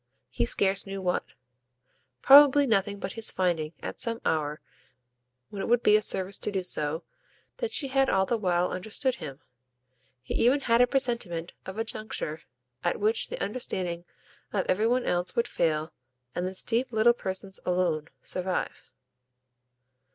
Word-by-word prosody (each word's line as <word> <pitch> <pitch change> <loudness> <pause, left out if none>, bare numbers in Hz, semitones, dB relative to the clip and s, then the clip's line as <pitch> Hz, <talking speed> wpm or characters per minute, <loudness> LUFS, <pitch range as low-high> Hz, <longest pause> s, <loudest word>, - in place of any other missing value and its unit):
He 120 -2 0
scarce 195 +6 +2
knew 195 0 -5
what: 180 -1 0 1.0
probably 285 0 +8
nothing 205 -4 +1
but - - -5
his 225 -1 +1
finding, 170 -4 -1
at - - -6
some 230 -1 -1
hour 150 -1 0 0.9
when 200 - -5
it - - -3
would 240 0 +3
be 210 - +6
a 215 - +4
service 190 -2 0
to - - -2
do 190 -2 -2
so, 155 -2 -2 0.5
that 470 - -2
she 320 -12 +2
had 270 0 +2
all 190 0 +3
the 235 - 0
while 180 -4 +1
understood 220 +8 -1
him. 140 0 -8 0.8
He - - -5
even 260 +5 +3
had 235 -2 +3
a 245 - +6
presentiment 235 -11 -1
of 190 +2 -7
a 225 - 0
juncture 215 -8 -5 0.4
at 175 - 0
which 215 +2 +1
the - - -5
understanding 185 -6 -3 0.5
of 195 -3 0
every 210 +4 +2
one 250 +1 +1
else 175 +5 0
would 235 0 +1
fail 155 -1 -1 0.4
and 180 +1 -2
this 185 0 0
deep 240 +2 0
little 225 +1 +4
person's 190 -3 -4
alone 175 -4 0 0.2
survive. 185 0 -3
195 Hz, 160 wpm, -28 LUFS, 175-235 Hz, 1.0 s, probably